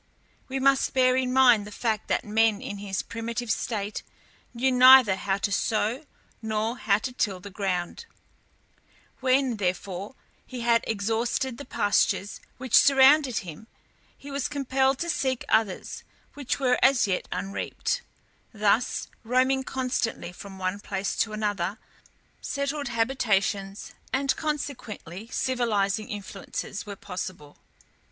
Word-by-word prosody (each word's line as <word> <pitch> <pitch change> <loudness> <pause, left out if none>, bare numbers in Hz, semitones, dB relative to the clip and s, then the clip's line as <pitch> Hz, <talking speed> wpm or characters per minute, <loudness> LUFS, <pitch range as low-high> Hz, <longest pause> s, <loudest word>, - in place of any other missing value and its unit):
We 265 0 -3
must 270 0 +2
bear 255 -1 +4
in 255 -1 0
mind 245 -5 +5
the - - -9
fact 220 -1 -2
that - - 0
man 220 0 +2
in 205 -1 -6
his 195 -1 -3
primitive 230 0 -4
state 210 -2 -2 0.5
knew 255 +2 +1
neither 255 -4 +8
how 195 0 -1
to 200 +1 -2
sow 225 +7 0 0.4
nor 220 +1 -1
how 200 -2 +3
to 250 +4 -5
till 200 -6 -1
the 200 +2 -10
ground; 190 - -3 1.1
when, 260 -2 +2
therefore, 190 +3 -3 0.3
he 250 -2 -7
had 235 0 +3
exhausted 225 +4 -1
the 285 - -7
pastures 205 -1 +1 0.2
which 255 -2 -8
surrounded 270 -2 +6
him 175 +6 -10 0.5
he 280 - -10
was 275 -1 -1
compelled 270 -2 +1
to 340 - -2
seek 260 -4 -1
others 220 -4 0 0.3
which 285 -2 -3
were 250 -2 +2
as 265 -3 +5
yet 190 -3 -1
unreaped; 195 +2 -3 0.5
thus, 215 +2 +1 0.2
roaming 260 +3 +2
constantly 255 -8 -2
from 195 +2 -11
one 185 +1 -2
place 195 -1 -3
to 225 - +1
another, 205 -2 -2 0.6
settled 280 0 -2
habitations, 215 -4 -1 0.2
and 275 +1 +1
consequently 240 - -5
civilizing 220 -5 0
influences, 200 0 -6
were 205 - -5
impossible. 180 -6 -7
225 Hz, 130 wpm, -26 LUFS, 200-260 Hz, 1.1 s, neither